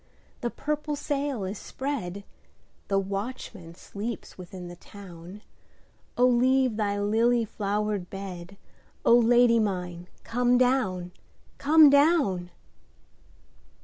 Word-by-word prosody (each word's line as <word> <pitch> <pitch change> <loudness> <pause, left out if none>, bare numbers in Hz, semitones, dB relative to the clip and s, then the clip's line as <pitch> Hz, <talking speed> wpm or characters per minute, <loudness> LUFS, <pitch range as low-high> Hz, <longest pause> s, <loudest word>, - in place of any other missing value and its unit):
the 240 - -2
purple 300 +3 -3
sail 285 -5 -2
is 190 +2 -5
spread, 215 -9 -5 0.6
The 195 - +1
watchman 195 -3 -5
sleeps 215 +5 -7
within 180 0 -9
the 175 - -9
town,O 195 +6 -7
leave 255 0 +3
thy 205 -2 -1
lily 230 +3 +2
flowered 205 -2 -2
bed,O 195 +4 -3
Lady 240 0 +5
mine 180 -4 -3 0.2
come 245 +1 +2
down, 230 -9 +1 0.5
come 300 0 +7
down! 280 - +3
215 Hz, 95 wpm, -27 LUFS, 190-250 Hz, 0.6 s, come